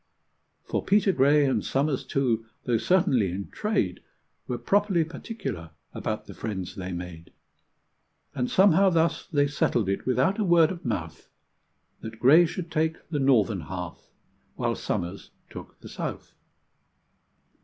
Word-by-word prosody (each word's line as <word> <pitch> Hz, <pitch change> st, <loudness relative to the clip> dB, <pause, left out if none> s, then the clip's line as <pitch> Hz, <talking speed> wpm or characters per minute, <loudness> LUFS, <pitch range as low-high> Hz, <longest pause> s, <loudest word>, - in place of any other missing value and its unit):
For -, -, -2 dB
Peter 205 Hz, 0 st, +3 dB
Gray, 145 Hz, -1 st, +4 dB
and 135 Hz, -, +1 dB
Somers, 135 Hz, 0 st, 0 dB
too, 115 Hz, -5 st, 0 dB, 0.2 s
though 120 Hz, -2 st, +1 dB
certainly 130 Hz, -, +2 dB
in 95 Hz, +2 st, -6 dB
trade, 210 Hz, -, -1 dB, 0.5 s
Were 125 Hz, -, -2 dB
properly 195 Hz, -, +2 dB
particular 155 Hz, -, -6 dB, 0.2 s
about -, -, -4 dB
the -, -, -10 dB
friends 95 Hz, -5 st, -5 dB
they 95 Hz, -1 st, -6 dB
made; 85 Hz, -2 st, -7 dB, 1.0 s
And 125 Hz, -3 st, -2 dB
somehow 195 Hz, 0 st, +5 dB
thus 165 Hz, -2 st, +1 dB
they 145 Hz, -3 st, +2 dB
settled 120 Hz, -6 st, 0 dB
it, 100 Hz, +5 st, -2 dB
without 130 Hz, -, +2 dB
a -, -, +2 dB
word 170 Hz, -3 st, +5 dB
of 175 Hz, -2 st, -7 dB
mouth, 80 Hz, -9 st, -4 dB, 0.7 s
That 110 Hz, 0 st, -8 dB
Gray 155 Hz, +8 st, +6 dB
should 170 Hz, 0 st, -6 dB
take 160 Hz, 0 st, -1 dB
the 150 Hz, -3 st, -1 dB
northern 115 Hz, -8 st, +3 dB
half, 85 Hz, +2 st, -7 dB, 0.5 s
while -, -, 0 dB
Somers 90 Hz, +3 st, -4 dB, 0.2 s
took -, -, -10 dB
the -, -, -10 dB
south. -, -, -6 dB
135 Hz, 140 wpm, -26 LUFS, 100-170 Hz, 1.0 s, Gray